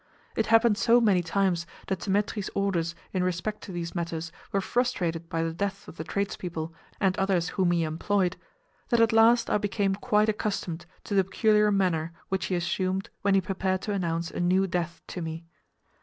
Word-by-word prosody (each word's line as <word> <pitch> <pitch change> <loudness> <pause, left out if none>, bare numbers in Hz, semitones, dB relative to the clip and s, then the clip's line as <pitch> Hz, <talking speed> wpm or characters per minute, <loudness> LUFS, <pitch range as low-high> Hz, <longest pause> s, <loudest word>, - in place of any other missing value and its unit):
It 225 - +1
happened 225 -1 +5
so 240 +1 +5
many 205 -6 +4
times 175 -1 0 0.2
that 190 -2 -2
Dthemetri's 205 0 -1
orders 175 -4 0 0.2
in 185 -2 +1
respect 185 +4 -2
to - - -8
these 170 -1 -4
matters 165 -1 -3 0.2
were 200 - +2
frustrated 180 -8 -1
by 165 0 -1
the 165 0 -2
deaths 200 +3 -3
of 165 - -11
the 160 - -4
tradespeople 170 -3 -3 0.3
and 190 -2 +2
others 190 -3 +1
whom 185 -3 +1
he 170 -1 +2
employed, 180 +4 0 0.5
that 235 - +3
at 230 -1 +4
last 230 +1 +5
I - - +3
became 200 -1 0
quite 210 +2 +2
accustomed 195 -6 -2 0.2
to - - -5
the 195 -1 +5
peculiar 210 +2 +3
manner 170 -5 +1 0.2
which 190 0 -1
he 185 - -1
assumed 185 +2 -1
when 200 -1 +3
he 195 - +4
prepared 190 0 -1
to 210 - -2
announce 170 -3 -1
a - - -5
new 185 +2 +3
death 175 -2 -3
to 180 - -5
me. 165 0 -5
190 Hz, 185 wpm, -27 LUFS, 170-205 Hz, 0.5 s, happened